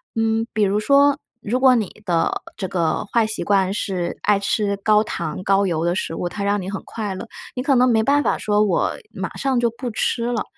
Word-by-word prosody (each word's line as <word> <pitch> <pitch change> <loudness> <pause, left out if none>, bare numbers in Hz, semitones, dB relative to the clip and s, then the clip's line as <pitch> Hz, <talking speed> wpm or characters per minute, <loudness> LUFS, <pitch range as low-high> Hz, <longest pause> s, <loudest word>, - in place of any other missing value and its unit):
嗯， 225 0 +1
比 215 - +1
如 200 +1 +2
说 280 +4 +4 0.2
如 235 +5 -1
果 260 -1 +6
你 215 -2 -3
的 170 -3 0 0.2
这 190 - -3
个 170 -1 0
坏 230 -2 +3
习 215 - -3
惯 195 -2 +2
是 180 -4 -2
爱 205 -1 +3
吃 200 0 0
高 210 +1 +3
糖 170 -4 -4
高 195 +1 +3
油 165 -2 -1
的 175 - +1
食 165 - -3
物， 180 - -2
它 200 - -5
让 205 +1 +1
你 185 - -5
很 195 - -5
快 210 -3 -4
乐， 185 - -7 0.3
你 250 - -2
可 275 0 +3
能 250 0 +5
没 225 -2 +3
办 285 +4 +3
法 - - +1
说 210 0 +2
我 200 -4 +1 0.2
马 - - -5
上 265 -2 +1
就 240 -1 +2
不 240 +1 -5
吃 230 +2 -1
了。 240 -3 -1
210 Hz, 245 characters per minute, -21 LUFS, 195-235 Hz, 0.3 s, 果